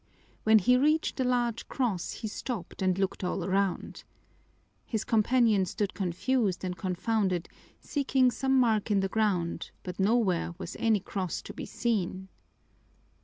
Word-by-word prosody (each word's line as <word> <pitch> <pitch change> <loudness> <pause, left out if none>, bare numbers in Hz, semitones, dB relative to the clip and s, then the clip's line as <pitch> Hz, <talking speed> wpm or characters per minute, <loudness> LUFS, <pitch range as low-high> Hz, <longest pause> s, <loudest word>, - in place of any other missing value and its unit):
When 220 0 +7
he 250 +5 +4
reached 305 +4 +2
the 260 - +1
large 240 -2 0
cross 220 -10 -1
he 220 - -5
stopped 210 -3 -5
and 185 -1 +2
looked 195 0 -1
all 180 0 -1
around. 195 0 -1 0.8
His 220 -2 -2
companion 225 -3 +3
stood 205 +1 -2
confused 195 +2 0
and 180 -1 -2
confounded, 185 -1 -1 0.3
seeking 265 -3 +2
some 265 +1 +2
mark 225 -4 +2
in 200 -2 +3
the 195 - 0
ground, 195 -5 0
but 180 0 -7
nowhere 190 -5 +2
was 190 - -7
any 220 -3 +2
cross 185 -2 -4
to - - -8
be - - -7
seen. 190 -5 -2
210 Hz, 145 wpm, -29 LUFS, 185-240 Hz, 0.8 s, When